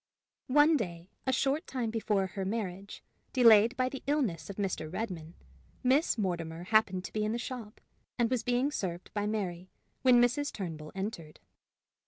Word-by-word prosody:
One 295 +4 +5
day, 175 -6 -5 0.2
a - - +4
short 275 +4 0
time 245 -4 -2
before 210 -3 +1
her 190 +1 -4
marriage, 195 -1 -4 0.3
delayed 230 -1 +6
by 255 0 +2
the 265 +1 -6
illness 260 - 0
of 200 - -6
Mr. 185 -6 -2
Redmain, 175 -4 -5 0.5
Miss 265 +3 +3
Mortimer 170 -4 -2
happened 190 -2 +2
to - - -8
be 215 - 0
in 215 +1 0
the - - -1
shop, 240 -3 -6 0.4
and 235 - +3
was 250 -3 +1
being 245 +4 +1
served 180 - -4
by 205 -1 -1
Mary, 185 -4 -3 0.3
when 255 -2 +6
Mrs. 250 +4 +2
Turnbull 160 -6 -6
entered. 190 -6 -5
215 Hz, 165 wpm, -31 LUFS, 185-250 Hz, 0.5 s, delayed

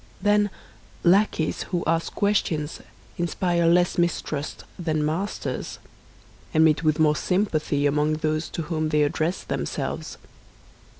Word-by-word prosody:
Then, 205 +1 +3 0.5
lackeys 180 -3 +3
who 175 -2 -1
ask 165 0 0
questions 165 -7 0 0.4
inspire 175 0 +1
less 175 +1 +3
mistrust 155 -4 -2 0.2
than 155 -3 0
masters, 175 +7 -3 0.8
and 160 +1 +6
meet 155 -1 +3
with 155 -1 +2
more 155 -2 +4
sympathy 155 -6 0
among 150 +2 +2
those 155 +1 -1
to 165 - -4
whom 155 -1 -1
they 150 -1 +3
address 160 +5 -1
themselves. - - -4
160 Hz, 120 wpm, -25 LUFS, 155-175 Hz, 0.8 s, and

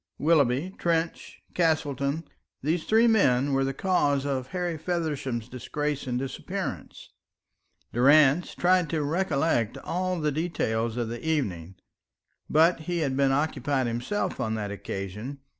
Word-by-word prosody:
Willoughby, 150 +2 +2
Trench, 165 -1 -2
Castleton 155 -3 0 0.4
these 160 +3 0
three 225 +2 +4
men 140 - +3
were 135 0 +2
the 135 - 0
cause 145 -4 +1
of 130 -3 -2
Harry 175 +2 -2
Feversham's 150 -8 -2
disgrace 145 +3 -3
and 125 -1 -1
disappearance. 135 +1 -5 0.8
Durrance 145 +5 +4
tried 180 -2 +3
to 155 -1 -1
recollect 150 - 0
all 185 0 -1
the 150 -1 0
details 120 -8 -1
of 120 -2 -1
the 120 +1 -6
evening; 95 - -2 0.7
but 165 +3 +4
he 175 -1 0
had 135 -4 0
been 135 0 +3
occupied 140 -2 0
himself 120 - -2
on 110 -3 -1
that 105 -2 -3
occasion. 100 +6 -5
145 Hz, 130 wpm, -27 LUFS, 125-165 Hz, 0.8 s, three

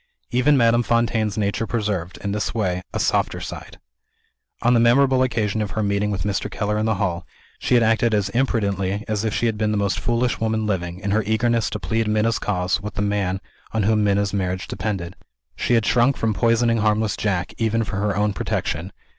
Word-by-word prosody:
Even 130 +4 +3
Madame 120 -1 +4
Fontaine's 115 -3 0
nature 105 +2 -1
preserved, 100 -7 -2
in 100 - -2
this 105 +2 -2
way, 90 -5 0
a - - -3
softer - - +1
side. - - -8 0.9
On 120 +1 +4
the 120 - +4
memorable 130 +3 +4
occasion 110 -4 0
of 105 - -2
her 110 - +1
meeting 100 0 0
with 95 -4 -2
Mr. 100 -1 -1
Keller 105 +1 -1
in 110 - 0
the 110 - +1
hall, 90 -3 -1 0.4
she - - +1
had 120 - +5
acted 115 +1 +2
as 100 -2 0
imprudently 100 -4 0
as 105 -1 -1
if 110 - 0
she 120 - 0
had 110 -2 0
been 110 -1 +1
the 105 - 0
most 100 -1 0
foolish 120 +1 0
woman 110 -1 0
living, 90 -3 -2
in 100 - -2
her 110 +2 +3
eagerness 115 -1 +1
to 105 - -4
plead 110 +5 -1
Minna's 110 +1 +1
cause 90 -1 -1
with 105 +1 -6
the 105 - -1
man 100 -2 0 0.3
on 110 -2 +1
whom 105 +1 +2
Minna's 100 -1 +1
marriage 95 -1 -2
depended. 95 -3 -4 0.4
She 120 - +1
had 115 -2 +2
shrunk 125 +3 +3
from 110 -1 0
poisoning 115 +1 +2
harmless 105 -1 +1
Jack, 95 -3 -1
even 115 0 +1
for 100 - -4
her 105 0 0
own 105 0 +1
protection. - - -3
105 Hz, 205 wpm, -22 LUFS, 100-115 Hz, 0.9 s, had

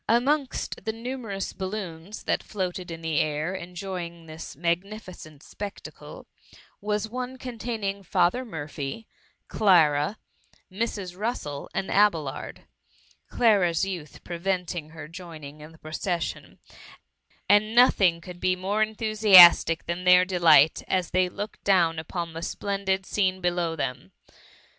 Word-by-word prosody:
Amongst 265 +4 0
the 220 - 0
numerous 225 -4 -5
bal 190 -1 -4
THE 215 - -4
MUMMY. 210 - -3
S69 - - -7 0.2
loons 210 +3 -9
that - - 0
floated 185 -3 -4
in 165 -1 -7
the 160 -2 0
air, 155 +4 -1
enjoying 175 -2 -6
this 155 -1 -9
mag* 170 +3 0
nificeiit 185 -8 -11
spectacle, 205 -1 -9 0.6
was 210 +1 -1
one 250 +3 -5
containing 225 -5 -4
Father 185 +6 +1
Murphy, 155 - -6 0.4
Clara, 165 -3 +3 0.5
Mrs. 195 -3 -3
Russel 185 - -4
and 190 - -2
Abelard 170 -9 0 0.4
— - - -34
Clara^s 195 -7 +3
youth 175 -6 -7
preventing 175 -2 -3
her 155 -2 -10
joining 160 -4 -10
in 155 +1 -11
the 165 - -17
procesfflon 160 +1 -4 0.5
— - - -39
^and 210 +3 +3
nothing 190 -8 +5
could 175 +1 -10
be 185 0 +1
more 200 +4 0
enthu 220 0 -3
siastic 185 -6 +8
than 170 +2 -3
their 180 0 +6
delight, 170 -5 +5
as 185 -2 -1
tliey 185 0 +2
looked 205 +3 -7
down 170 -5 +3
upon 165 +1 -5
the 165 - -6
splendid 195 +1 -2
scene 190 -2 0
below 175 -2 -1
them. 125 - -4
185 Hz, 140 wpm, -26 LUFS, 165-210 Hz, 0.6 s, siastic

